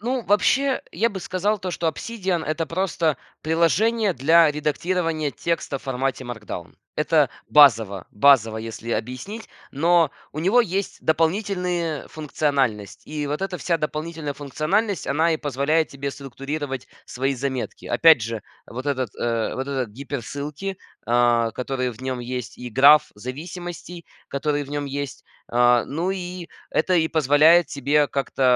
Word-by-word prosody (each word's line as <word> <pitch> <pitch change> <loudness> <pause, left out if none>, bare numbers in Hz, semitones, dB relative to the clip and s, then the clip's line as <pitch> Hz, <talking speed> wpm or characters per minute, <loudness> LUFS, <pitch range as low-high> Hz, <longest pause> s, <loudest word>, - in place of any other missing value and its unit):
Ну, 245 +3 -1
вообще, 260 +7 +3
я 230 - +2
бы 200 -4 -6
сказал 195 +4 -1
то, 185 -1 -4
что 170 -1 -2
"Обсидиан"- 185 +1 -2
это 155 +1 -2
просто 165 -3 0 0.2
приложение 185 - +2
для 160 +3 +5
редактирования 155 +1 -1
текста 140 +4 -2
в - - -21
формате 135 0 -2
Markdown. 105 -7 -7 0.2
Это 150 -3 +2 0.2
базово 110 -10 +5
базово, 115 -3 +4
если 115 +1 -6
объяснить, 130 - -4 0.2
но 165 +2 +3 0.2
у 155 - -4
него 195 +9 +4
есть 195 -3 -2
дополнительные 170 -1 0
функциональность, 135 -9 -2
и 150 -1 -3
вот 145 +1 -3
эта 195 -1 -2
вся 170 -1 0
дополнительная 155 -1 -4
функциональность, 155 - -1
она 160 +4 +2
и 160 - -1
позволяет 150 +3 +1
тебе 140 0 -5
структурировать 135 0 -5 0.2
свои 135 +2 -1
заметки. 130 -1 -4
Опять 160 -5 +6
же, 115 0 -4 0.2
вот 130 +3 -7
этот, 130 -4 -1
э 115 -1 -1
вот 130 +1 -3
эти 130 -4 -2
гиперссылки, 140 - -5 0.3
а, 120 -1 +3
которые 125 +1 -2
в 115 - -14
нем 130 -1 -2
есть, 125 0 -5
и 125 - -6
граф 140 +6 +6
зависимостей, 170 - -7 0.2
который 145 +1 -1
в 140 - -10
нем 145 0 -2
есть, 140 -1 -5 0.2
а. 120 0 +4
Ну, 165 +6 -2
и 180 -2 -5 0.2
это 170 - +1
и 160 -2 +3
позволяет 155 +2 +5
тебе 145 +2 +2
как-то, 135 -1 -3
150 Hz, 145 wpm, -23 LUFS, 130-170 Hz, 0.3 s, Опять